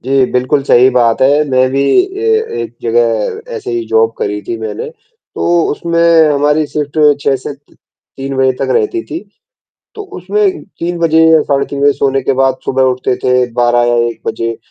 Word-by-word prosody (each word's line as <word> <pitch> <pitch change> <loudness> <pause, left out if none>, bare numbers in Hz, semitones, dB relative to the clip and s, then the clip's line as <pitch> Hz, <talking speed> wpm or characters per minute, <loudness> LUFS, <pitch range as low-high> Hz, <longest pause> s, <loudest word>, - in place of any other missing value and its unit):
जी, 135 +1 +1
बिल्कुल 130 +3 +1
सही 130 -1 +4
बात 120 -3 +1
है। 145 +3 +3
मैं 130 0 +2
भी 135 +1 0 0.2
अ, 440 +3 -1
एक 115 -1 -5
जगह 115 - 0 0.2
ऐसे 410 -3 -6
ही 355 -2 -2
जॉब 450 0 +2
करी 395 -7 -3
थी 355 -1 -5
मैंने। 450 +1 -5 0.5
तो 170 -1 +1
उसमें 170 0 +2
हमारी 150 +2 +1
शिफ्ट 150 +1 -4 0.2
6 140 -1 +1
से 130 - -7 0.6
3 135 0 -5 0.2
तक - - -3
रहती 420 -6 0
थी। 325 - -6 0.8
तो 425 - -6 0.2
उसमें 405 -3 -1 0.2
3 175 +1 -3
बजे 160 -1 +3
या 160 -1 +5
साढ़े 140 -1 0
3 140 - -6
बजे 145 0 +4
सोने 135 -1 0
के 135 - 0
बाद 130 0 +1
सुबह 130 0 +1
उठते 130 -1 0
थे 125 - +1 0.2
12 120 0 +2
या 120 - +2
1 115 0 -4
140 Hz, 175 wpm, -13 LUFS, -, 0.8 s, या